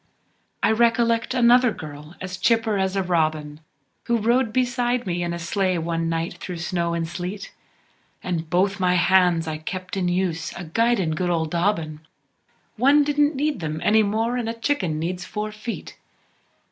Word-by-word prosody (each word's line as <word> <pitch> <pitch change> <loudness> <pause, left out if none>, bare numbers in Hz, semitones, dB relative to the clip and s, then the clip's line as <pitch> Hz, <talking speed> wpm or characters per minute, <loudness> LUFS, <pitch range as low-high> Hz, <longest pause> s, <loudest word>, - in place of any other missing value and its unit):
I - - +4
recollect 230 +1 +2
another 245 0 +5
girl, 150 -3 -9
as 185 -1 -6
chipper 225 +1 +2
as 190 0 0
a 195 - +1
robin, 155 -4 -1 0.5
Who 235 - +2
rode 235 +2 +2
beside 245 0 0
me 175 -2 -2
in 175 0 -2
a 170 - -3
sleigh 185 +2 0
one 165 0 -1
night 165 +1 -2
through 180 -2 -6
snow 170 0 -1
an' 165 -1 -1
sleet, 180 +4 -6 0.7
An' 180 -2 -1
both 190 +4 +1
my 180 -1 +2
hands 180 -2 +3
I 155 -1 -3
kept 185 +4 -5
in 185 -2 0
use 175 -2 -1
a 175 - -7
guidin' 195 0 +1
good 175 +3 -1
ol' 165 -2 +1
Dobbin 165 -2 -1 0.8
One 280 +5 +5
didn't 295 +1 +2
need 290 -2 -1
them 155 -2 -3
any 220 +1 +5
mor'n 225 +3 0
a 230 - -3
chicken 230 - -1
needs 180 +3 -3
four 210 +3 -4
feet. 215 +2 -7
185 Hz, 165 wpm, -23 LUFS, 170-230 Hz, 0.8 s, another